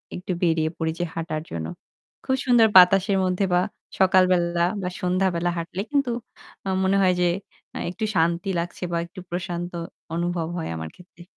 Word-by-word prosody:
একটু 180 Hz, +1 st, -5 dB
বেরিয়ে 160 Hz, -2 st, +2 dB
পড়ি 160 Hz, -1 st, -1 dB
যে -, -, +1 dB
হাঁটার 160 Hz, -2 st, -3 dB
জন্য। 80 Hz, -1 st, -4 dB, 0.6 s
খুব 265 Hz, -, +2 dB
সুন্দর 240 Hz, -3 st, +6 dB
বাতাসের 195 Hz, +2 st, +7 dB
মধ্যে 185 Hz, +1 st, +1 dB
বা 180 Hz, -, +4 dB, 0.4 s
সকাল 185 Hz, -1 st, +6 dB
বেলা 170 Hz, -1 st, +2 dB, 0.2 s
বা 180 Hz, -, -2 dB
সন্ধ্যাবেলা 180 Hz, -1 st, +1 dB
হাঁটলে 175 Hz, +3 st, -4 dB
কিন্তু 280 Hz, -4 st, +1 dB, 0.5 s
আমার 190 Hz, -1 st, -1 dB
মনে 195 Hz, +1 st, +3 dB
হয় 185 Hz, -1 st, +4 dB
যে 175 Hz, -, +4 dB, 0.6 s
একটু 215 Hz, +5 st, -6 dB
শান্তি 170 Hz, +3 st, +1 dB
লাগছে 175 Hz, +1 st, -5 dB
বা 170 Hz, -, 0 dB
একটু 180 Hz, +2 st, -12 dB
প্রশান্ত 175 Hz, 0 st, -4 dB, 0.4 s
অনুভব 170 Hz, -1 st, -1 dB
হয় 165 Hz, -, -3 dB
আমার 80 Hz, 0 st, -5 dB
ক্ষেত্রে। 180 Hz, -1 st, -16 dB
180 Hz, 165 wpm, -24 LUFS, 170-190 Hz, 0.6 s, বাতাসের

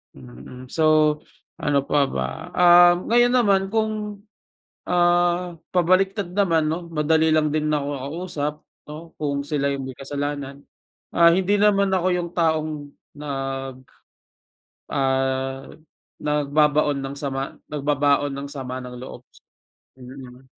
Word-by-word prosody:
Mm. 70 Hz, -, -12 dB
So, 155 Hz, -1 st, +3 dB, 0.4 s
ano 140 Hz, -2 st, +1 dB
pa 140 Hz, 0 st, +1 dB
ba? 65 Hz, 0 st, -4 dB
Um, 175 Hz, +1 st, +6 dB
ngayon 240 Hz, +1 st, +4 dB
naman 200 Hz, -6 st, +3 dB
kung 210 Hz, -1 st, -3 dB, 0.7 s
ah, 175 Hz, 0 st, +2 dB, 0.2 s
pabaliktad 185 Hz, +1 st, +1 dB
naman 170 Hz, -6 st, +2 dB
'no, 170 Hz, +2 st, -3 dB
madali 160 Hz, 0 st, +2 dB
lang 155 Hz, -1 st, +2 dB
din 155 Hz, 0 st, 0 dB
na 150 Hz, -, +2 dB
ako 140 Hz, 0 st, -3 dB, 0.2 s
kausap 150 Hz, -3 st, -3 dB, 0.4 s
'no, 160 Hz, +2 st, -10 dB
kung 140 Hz, -1 st, -2 dB
sila 145 Hz, -1 st, -1 dB
yung 140 Hz, -1 st, -3 dB
may 130 Hz, -, -7 dB
kasalanan. 140 Hz, 0 st, -5 dB, 0.4 s
Ah, 170 Hz, 0 st, +5 dB
hindi 190 Hz, +3 st, +2 dB
naman 200 Hz, -1 st, +3 dB
ako 185 Hz, -1 st, 0 dB
yung 175 Hz, -1 st, -2 dB
taong 155 Hz, -3 st, -1 dB, 0.2 s
nag 135 Hz, -2 st, -5 dB, 1.1 s
ah, 135 Hz, 0 st, -1 dB, 0.6 s
nagbabaon 150 Hz, -1 st, +1 dB
ng 135 Hz, +1 st, -6 dB
sama 135 Hz, -1 st, -4 dB, 0.2 s
nagbabaon 145 Hz, 0 st, +1 dB
ng 140 Hz, 0 st, -6 dB
sama 130 Hz, -2 st, -6 dB
ng 125 Hz, -, -8 dB
loob. 130 Hz, -, -10 dB, 0.7 s
Mm, 130 Hz, 0 st, -12 dB
150 Hz, 120 wpm, -23 LUFS, 140-175 Hz, 1.1 s, Um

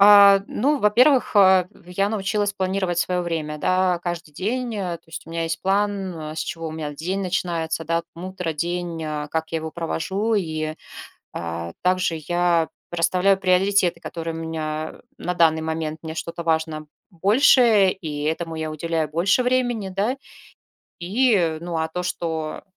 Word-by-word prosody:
А, 200 Hz, -1 st, +8 dB
ну, 285 Hz, +5 st, +1 dB
во-первых, 250 Hz, +6 st, +4 dB
а, 190 Hz, -3 st, +6 dB, 0.2 s
я 180 Hz, +3 st, 0 dB
научилась 205 Hz, -1 st, 0 dB
планировать 190 Hz, -2 st, -1 dB
свое 180 Hz, 0 st, 0 dB
время, 160 Hz, -3 st, -3 dB
да, 185 Hz, +1 st, +2 dB
каждый 175 Hz, -2 st, -4 dB
день. 235 Hz, -, -2 dB
То 180 Hz, -5 st, -3 dB
есть 165 Hz, +1 st, -9 dB
у -, -, -11 dB
меня 165 Hz, 0 st, -2 dB
есть 165 Hz, 0 st, -2 dB
план, 190 Hz, -5 st, -1 dB
с -, -, -3 dB
чего 165 Hz, +1 st, -4 dB
у -, -, -6 dB
меня 155 Hz, -2 st, -5 dB
день 180 Hz, +7 st, -3 dB
начинается, 170 Hz, -3 st, -2 dB
да. 165 Hz, +1 st, 0 dB
Утро, 180 Hz, -1 st, -4 dB
день, 170 Hz, +1 st, -3 dB
а, 150 Hz, -1 st, -3 dB
как 160 Hz, +1 st, -2 dB
я 165 Hz, -, -1 dB
его 160 Hz, 0 st, -6 dB
провожу, 190 Hz, +6 st, -1 dB
и, 155 Hz, -5 st, -1 dB, 0.6 s
а, 85 Hz, 0 st, -5 dB
также 180 Hz, -2 st, +1 dB
я 175 Hz, -2 st, +2 dB, 0.2 s
расставляю 180 Hz, +3 st, +3 dB
приоритеты, 185 Hz, -1 st, +2 dB
которые 165 Hz, -1 st, -5 dB
у -, -, -6 dB
меня 155 Hz, -1 st, -4 dB, 0.2 s
на 180 Hz, -, -2 dB
данный 165 Hz, -2 st, +3 dB
момент. 160 Hz, -1 st, -3 dB
Мне 160 Hz, -1 st, -6 dB
что-то 170 Hz, +1 st, -5 dB
важно 160 Hz, -1 st, -1 dB, 0.2 s
больше, 210 Hz, -, +5 dB
и 155 Hz, -6 st, -4 dB
этому 160 Hz, +2 st, -2 dB
я 160 Hz, -1 st, -3 dB
уделяю 160 Hz, 0 st, -2 dB
больше 175 Hz, +10 st, +2 dB
времени, 245 Hz, -5 st, 0 dB
да. 200 Hz, +7 st, 0 dB, 0.8 s
И, 185 Hz, -4 st, +2 dB
ну, 170 Hz, -1 st, -3 dB
а 160 Hz, 0 st, 0 dB
то, 180 Hz, +3 st, -4 dB
что, 160 Hz, -3 st, -3 dB
175 Hz, 160 wpm, -23 LUFS, 160-195 Hz, 0.8 s, А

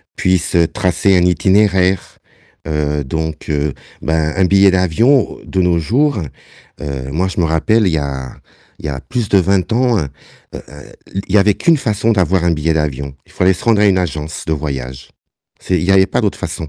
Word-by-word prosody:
puisse, 95 Hz, -1 st, 0 dB
heu, 85 Hz, -1 st, +4 dB
tracer 95 Hz, 0 st, +1 dB
un 90 Hz, -, +3 dB
itinéraire, 95 Hz, +1 st, +1 dB, 0.5 s
heu, 75 Hz, -1 st, -1 dB
donc, 80 Hz, +3 st, -5 dB
heu, 75 Hz, -2 st, -1 dB, 0.3 s
bah, 80 Hz, -1 st, 0 dB
un 95 Hz, -, +3 dB
billet 100 Hz, +1 st, +5 dB
d'avion 105 Hz, -, +2 dB
de 95 Hz, -, -1 dB
nos 90 Hz, -1 st, +2 dB
jours, 120 Hz, -, +1 dB, 0.6 s
heu, 70 Hz, -3 st, -5 dB
moi 90 Hz, +6 st, 0 dB
je 95 Hz, -, -4 dB
me -, -, +2 dB
rappelle, 100 Hz, +7 st, +1 dB
il 85 Hz, -, 0 dB
y -, -, +1 dB
a 65 Hz, -2 st, -5 dB, 0.4 s
il -, -, -10 dB
y -, -, -2 dB
a 65 Hz, -1 st, -4 dB
plus 120 Hz, -4 st, -3 dB
de 100 Hz, -, +4 dB
20 95 Hz, +3 st, 0 dB
ans, 125 Hz, -1 st, +2 dB
heu, -, -, -1 dB
heu, 70 Hz, -, -7 dB, 1.1 s
l 100 Hz, -, -1 dB
il 95 Hz, -, -3 dB
y -, -, +7 dB
avait 100 Hz, +1 st, +3 dB
qu'une 170 Hz, -, +2 dB
façon 110 Hz, -1 st, 0 dB
d'avoir 95 Hz, -2 st, +1 dB
un 85 Hz, -, +2 dB
billet 80 Hz, +1 st, 0 dB
d'avion, 70 Hz, -3 st, -3 dB
il -, -, -22 dB
fallait 95 Hz, +1 st, +2 dB
se 90 Hz, -, -10 dB
rendre 110 Hz, -3 st, +3 dB
à -, -, +5 dB
une 95 Hz, -2 st, +3 dB
agence 80 Hz, -3 st, -4 dB
de 80 Hz, -, -1 dB
voyage. 65 Hz, -4 st, -6 dB, 0.5 s
C'est 90 Hz, -, -2 dB
il -, -, -3 dB
y 95 Hz, -, 0 dB
avait 95 Hz, 0 st, +5 dB
pas -, -, -1 dB
d'autres -, -, -1 dB
façons. 80 Hz, -, -5 dB
90 Hz, 210 wpm, -16 LUFS, 75-100 Hz, 1.1 s, y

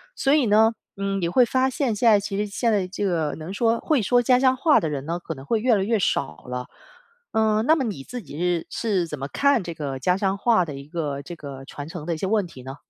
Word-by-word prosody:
所 275 Hz, -, +1 dB
以 285 Hz, -5 st, +3 dB
呢， 220 Hz, +2 st, +4 dB, 0.2 s
嗯， 195 Hz, 0 st, -2 dB
你 170 Hz, -, 0 dB
会 245 Hz, +9 st, +4 dB
发 260 Hz, +2 st, +2 dB
现 260 Hz, -4 st, -1 dB
现 235 Hz, +3 st, +1 dB
在 205 Hz, -, +6 dB
其 200 Hz, 0 st, -4 dB
实 210 Hz, -, 0 dB
现 225 Hz, +3 st, 0 dB
在 195 Hz, -3 st, +1 dB
这 195 Hz, +2 st, -5 dB
个 165 Hz, -6 st, 0 dB
能 160 Hz, +4 st, -7 dB
说 230 Hz, +2 st, +1 dB
会 300 Hz, -5 st, +1 dB
说 245 Hz, +4 st, +3 dB
家 250 Hz, +1 st, +4 dB
乡 260 Hz, -1 st, +4 dB
话 300 Hz, +3 st, +4 dB
的 160 Hz, -, -2 dB
人 140 Hz, +1 st, -4 dB
呢， 170 Hz, +1 st, -2 dB
可 165 Hz, -, -6 dB
能 135 Hz, -2 st, -11 dB
会 220 Hz, +9 st, 0 dB
越 240 Hz, +1 st, +3 dB
来 195 Hz, -, +1 dB
越 225 Hz, +2 st, +1 dB
少 75 Hz, -, -1 dB
了。 125 Hz, 0 st, -5 dB, 0.6 s
嗯， 220 Hz, 0 st, +2 dB
那 315 Hz, +2 st, +5 dB
么 275 Hz, -, -1 dB
你 195 Hz, -, -4 dB
自 245 Hz, -, -7 dB
己 145 Hz, -3 st, -10 dB
是 175 Hz, -1 st, 0 dB
是 195 Hz, -7 st, -1 dB
怎 150 Hz, -, -6 dB
么 135 Hz, -, -4 dB
看 280 Hz, -, +2 dB
这 170 Hz, -, -5 dB
个 140 Hz, -4 st, -4 dB
家 180 Hz, +8 st, +1 dB
乡 195 Hz, -1 st, 0 dB
话 220 Hz, -5 st, +3 dB
的 145 Hz, -3 st, -7 dB
一 140 Hz, +1 st, -9 dB
个， 150 Hz, -4 st, -3 dB
这 175 Hz, +3 st, -8 dB
个 135 Hz, -3 st, -9 dB
传 145 Hz, +1 st, -8 dB
承 160 Hz, -2 st, -7 dB
的 170 Hz, -, -1 dB
一 -, -, -4 dB
些 190 Hz, -, -2 dB
问 210 Hz, -2 st, +1 dB
题 145 Hz, -7 st, -12 dB
呢？ 135 Hz, +1 st, -7 dB
195 Hz, 295 characters per minute, -24 LUFS, 155-230 Hz, 0.6 s, 在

